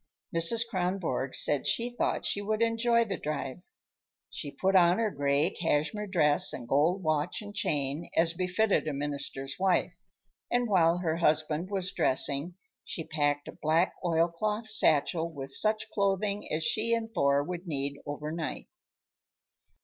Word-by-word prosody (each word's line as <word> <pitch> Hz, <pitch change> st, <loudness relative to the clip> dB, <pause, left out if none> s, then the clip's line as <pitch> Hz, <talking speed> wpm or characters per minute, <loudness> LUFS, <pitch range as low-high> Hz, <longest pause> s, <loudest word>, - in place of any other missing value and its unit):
Mrs. 225 Hz, +8 st, +5 dB
Kronborg 180 Hz, -, -2 dB
said 145 Hz, -3 st, +4 dB
she 235 Hz, +1 st, 0 dB
thought 240 Hz, -, -2 dB
she 200 Hz, -, 0 dB
would 215 Hz, +2 st, -1 dB
enjoy 230 Hz, +1 st, +2 dB
the 200 Hz, -3 st, -4 dB
drive. 145 Hz, 0 st, -4 dB, 0.7 s
She 145 Hz, -, -6 dB
put 190 Hz, +6 st, -1 dB
on 175 Hz, 0 st, +5 dB
her 225 Hz, -2 st, 0 dB
gray 145 Hz, +3 st, +1 dB
cashmere 170 Hz, +6 st, -1 dB
dress 150 Hz, -6 st, +4 dB
and 120 Hz, -, -7 dB
gold 160 Hz, +9 st, +1 dB
watch 155 Hz, +3 st, -1 dB
and 205 Hz, 0 st, -10 dB
chain, 150 Hz, -4 st, -1 dB
as 165 Hz, 0 st, +3 dB
befitted 185 Hz, +1 st, 0 dB
a 155 Hz, -, -2 dB
minister's 140 Hz, -1 st, -5 dB
wife, 185 Hz, -2 st, +1 dB, 0.5 s
and 245 Hz, 0 st, 0 dB
while 175 Hz, -4 st, +3 dB
her 165 Hz, -2 st, -2 dB
husband 155 Hz, +1 st, +1 dB
was 190 Hz, -2 st, -1 dB
dressing 140 Hz, +6 st, 0 dB, 0.3 s
she 165 Hz, -, -5 dB
packed 145 Hz, -2 st, -1 dB
a -, -, -6 dB
black 160 Hz, +4 st, +2 dB
oilcloth 175 Hz, +6 st, -1 dB
satchel 165 Hz, -4 st, +2 dB
with 135 Hz, -3 st, -6 dB
such 215 Hz, +8 st, +1 dB
clothing 200 Hz, +1 st, -1 dB
as 155 Hz, +1 st, -1 dB
she 230 Hz, +6 st, +1 dB
and 225 Hz, -1 st, -5 dB
Thor 140 Hz, 0 st, +2 dB
would 175 Hz, +3 st, -7 dB
need 140 Hz, -2 st, -2 dB
overnight. 150 Hz, +2 st, -5 dB
170 Hz, 150 wpm, -29 LUFS, 145-200 Hz, 0.7 s, Mrs